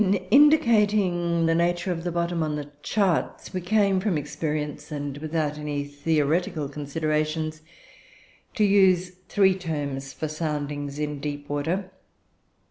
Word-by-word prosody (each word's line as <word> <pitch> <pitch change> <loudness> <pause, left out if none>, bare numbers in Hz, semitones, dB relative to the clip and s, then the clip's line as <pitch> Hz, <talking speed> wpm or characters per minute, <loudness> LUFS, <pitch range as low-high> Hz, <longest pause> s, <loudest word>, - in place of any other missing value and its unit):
"In 195 0 +3 0.2
indicating 210 - +4
the 165 - +3
nature 175 +2 +1
of 165 -1 -3
the 175 - -2
bottom 170 0 -1
on 155 -1 -1
the 145 -1 -6
charts, 195 -1 0
we 185 - -2
came, 195 0 +2
from 185 -4 0
experience 150 +1 -4
and 145 -1 -4
without 155 -1 -2
any 145 -1 -2
theoretical 150 +2 0
considerations, 155 +2 -2 0.9
to 215 - +2
use 190 -3 +4 0.2
three 195 -2 +4
terms 145 -7 -4
for 155 - -4
soundings 150 -2 -3
in 150 -1 -3
deep 145 0 -5
water. 170 +7 -2
160 Hz, 130 wpm, -25 LUFS, 150-185 Hz, 0.9 s, indicating